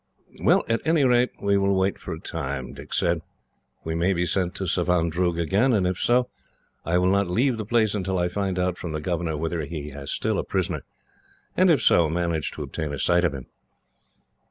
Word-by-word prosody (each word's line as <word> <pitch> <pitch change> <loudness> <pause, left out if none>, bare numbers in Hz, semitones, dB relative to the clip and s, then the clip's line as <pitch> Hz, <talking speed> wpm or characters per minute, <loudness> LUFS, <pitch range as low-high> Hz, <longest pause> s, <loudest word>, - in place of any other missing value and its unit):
"Well, - - +4
at 115 0 0
any 160 -2 +3
rate 125 -1 +4
we 100 0 +2
will 100 0 +2
wait 95 +1 0
for - - -7
a - - -5
time," 65 -1 -5
Dick - - -11
said. - - +1 0.6
"We 80 - -3
may 85 +4 +1
be 90 0 0
sent 90 +1 0
to 100 - -3
Savandroog 85 -1 +1
again, 100 +10 +2
and 100 -4 +2
if 90 0 -1
so, 125 +1 +3 0.6
I 85 +2 +1
will 90 +1 +3
not 100 -2 +2
leave 120 +6 +1
the 110 -2 -5
place 110 -2 +2
until 95 -2 -1
I 90 0 +1
find 95 0 -2
out 90 -1 -1
from 85 -3 -5
the 75 - -2
governor 85 -1 -2
whether 80 +1 -2
he 75 0 -6
has 70 0 -8
still - - -1
a - - -1
prisoner; 90 -5 -2 0.7
and 185 0 +4
if 160 - +3
so, 85 -3 +4
manage 85 -2 -1
to - - -5
obtain 75 -2 -4
a 70 - -4
sight 85 +6 +2
of 80 -5 +1
him." 65 - -7
90 Hz, 210 wpm, -24 LUFS, 85-100 Hz, 0.7 s, Well